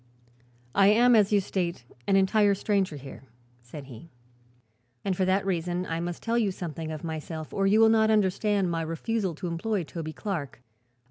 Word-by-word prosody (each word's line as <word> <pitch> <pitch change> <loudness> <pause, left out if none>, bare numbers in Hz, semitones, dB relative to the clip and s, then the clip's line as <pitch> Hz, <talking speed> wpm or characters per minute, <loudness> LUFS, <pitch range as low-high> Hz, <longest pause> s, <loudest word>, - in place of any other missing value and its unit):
"I 195 0 +5
am, 235 +4 +5
as 210 -2 +4
you 205 - +4
state, 175 -7 -3 0.2
an 195 - +3
entire 200 +1 +3
stranger 195 -4 0
here," 140 -1 -10 0.4
said 125 +5 -10
he, 130 +4 -12 1.0
"and 195 -2 0
for 185 - +1
that 190 +1 +1
reason 175 -1 -1
I 165 -1 -3
must 175 0 -5
tell 235 +1 +1
you 210 -4 +1
something 165 -3 -6
of 155 -2 -6
myself 160 -1 -6
or 195 0 +1
you 210 +3 +4
will 225 0 +6
not 220 -1 +4
understand 200 -2 +1
my 165 -1 -1
refusal 175 +3 -2
to 180 +3 -5
employ 180 +4 -2
Toby 155 0 -6
Clark. 150 - -5
185 Hz, 180 wpm, -27 LUFS, 165-205 Hz, 1.0 s, will